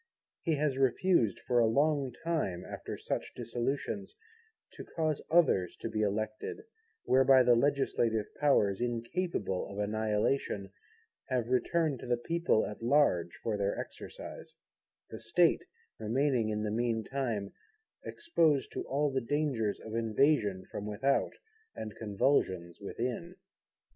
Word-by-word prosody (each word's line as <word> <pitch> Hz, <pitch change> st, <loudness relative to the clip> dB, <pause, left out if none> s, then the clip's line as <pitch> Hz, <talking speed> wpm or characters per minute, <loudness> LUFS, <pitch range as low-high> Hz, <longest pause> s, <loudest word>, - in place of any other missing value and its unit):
He 165 Hz, -3 st, +1 dB
has 145 Hz, -2 st, 0 dB
refused 135 Hz, -, +2 dB
for 120 Hz, -1 st, +3 dB
a 115 Hz, -, +5 dB
long 140 Hz, +2 st, +2 dB
time, 100 Hz, -, -1 dB
after -, -, -6 dB
such -, -, -4 dB
dissolutions, 135 Hz, -, -3 dB, 0.6 s
to -, -, -9 dB
cause 155 Hz, -3 st, -2 dB
others 155 Hz, -, +3 dB
to -, -, -4 dB
be 110 Hz, -, -2 dB
elected; 110 Hz, -, -2 dB, 0.4 s
whereby 130 Hz, 0 st, +6 dB
the 125 Hz, 0 st, +5 dB
Legislative 120 Hz, -4 st, +1 dB
Powers, 110 Hz, -9 st, +3 dB
incapable 120 Hz, -, -2 dB
of 100 Hz, -, -8 dB
Annihilation, 105 Hz, 0 st, 0 dB, 0.6 s
have 125 Hz, -2 st, -1 dB
returned 145 Hz, +2 st, +1 dB
to -, -, -8 dB
the 120 Hz, 0 st, +2 dB
People 170 Hz, -2 st, +1 dB
at 105 Hz, -, -7 dB
large 115 Hz, -, +2 dB
for 110 Hz, -2 st, -1 dB
their 100 Hz, 0 st, -1 dB
exercise; -, -, -8 dB, 0.6 s
the 110 Hz, -, -7 dB
State 160 Hz, +10 st, +2 dB, 0.3 s
remaining 120 Hz, +1 st, +1 dB
in 105 Hz, 0 st, -1 dB
the 105 Hz, -, -1 dB
mean 115 Hz, 0 st, 0 dB
time 115 Hz, -8 st, -3 dB, 0.5 s
exposed 165 Hz, -, +1 dB
to -, -, -4 dB
all 145 Hz, +2 st, 0 dB
the 130 Hz, 0 st, 0 dB
dangers 125 Hz, -5 st, -1 dB
of 110 Hz, -, -9 dB
invasion 115 Hz, -3 st, +2 dB
from 105 Hz, -, -5 dB
without, 135 Hz, +7 st, +1 dB, 0.4 s
and 110 Hz, -1 st, -6 dB
convulsions 95 Hz, -, 0 dB
within. 125 Hz, -, -4 dB
120 Hz, 130 wpm, -31 LUFS, 105-145 Hz, 0.6 s, whereby